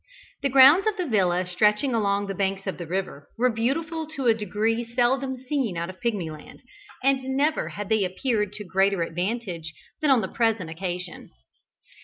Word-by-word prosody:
The 280 - +1
grounds 275 - +7
of 430 -1 0
the 365 - -1
villa 185 - +1
stretching 210 +8 +2
along 205 -2 +1
the 195 - -4
banks 195 0 -2
of 190 - -4
the 170 - -6
river, 175 -5 -4
were 250 +2 +3
beautiful 315 +8 -2
to 270 - -3
a 230 - +6
degree 220 +2 -1
seldom 255 +3 0
seen 260 - -1
out 170 +2 -3
of 185 - -21
Pigmyland, 170 -10 -4 0.4
and 270 0 +3 0.2
never 305 +3 +1
had 205 -1 -6
they 220 -2 +3
appeared 210 +2 -1
to 210 - -6
greater 195 -1 +1
advantage 175 -1 -3 0.3
than 305 - +2
on 260 -4 +5
the - - -2
present 220 -8 0
occasion. 180 +1 -5
210 Hz, 175 wpm, -25 LUFS, 185-260 Hz, 0.4 s, grounds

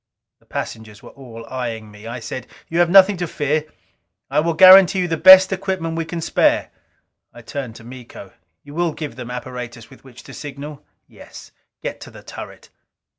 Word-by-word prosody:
The - - -32
passengers 110 -2 -7
were - - -12
all 115 -4 -12
eying 115 -4 -5
me. 105 +2 -13
I 120 +2 -6
said: 125 +2 -7 0.2
"You 165 - -1
have 175 -1 +3
nothing 195 +1 +6
to 175 0 -3
fear. 150 0 -2 0.7
I 145 - +2
will 165 +1 0
guarantee 190 +1 +8
you 180 - -1
the 165 - -1
best 190 +3 +8
equipment 185 -4 -3
we 165 0 -3
can 165 +1 -6
spare." - - +1 0.6
I 120 - -14
turned 120 -1 -7
to 115 - -13
Miko. 120 -5 -12 0.3
"You 145 - -13
will 170 0 -1
give 150 -6 -7
them 125 -1 -8
apparatus 125 -2 -8
with - - -17
which 130 -3 -15
to - - -13
signal?" 145 0 -9 0.2
"Yes. - - -14 0.3
Get - - -6
to - - -10
the - - -15
turret." - - -11
145 Hz, 185 wpm, -20 LUFS, 120-170 Hz, 0.7 s, guarantee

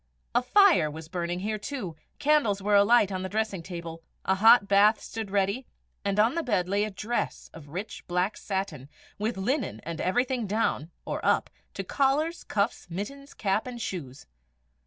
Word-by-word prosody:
A 240 - +4
fire 335 - +5
was 160 +1 -8
burning 175 0 -3
here 215 +1 -2
too, 210 - -5 0.2
candles 290 -9 +3
were 205 +1 0
alight 205 0 +5
on 185 -1 -2
the 190 - -4
dressing 215 -3 -1
table, 170 -2 -7 0.2
a 190 - +3
hot 210 +2 +6
bath 205 +2 +5
stood 225 -2 -6
ready, 200 +6 0 0.4
on 210 +4 +3
the 335 - 0
bed 205 - 0
lay 200 +2 +1
a 215 - -1
dress 215 +4 -3
of 150 -3 -12
rich 185 +8 -6
black 180 +4 0
satin, 190 -10 -4 0.3
with 215 +1 -1
linen 205 - -1
and 165 0 -5
everything 245 +3 0
down, 195 -6 0 0.2
or - - -4
up, - - +2 0.2
to - - -3
collars, 295 +5 +1
cuffs, 200 0 -1
mittens, 275 +11 -6
cap, 205 +3 0
and 245 -1 -6
shoes. 145 - -6
205 Hz, 170 wpm, -28 LUFS, 185-240 Hz, 0.4 s, hot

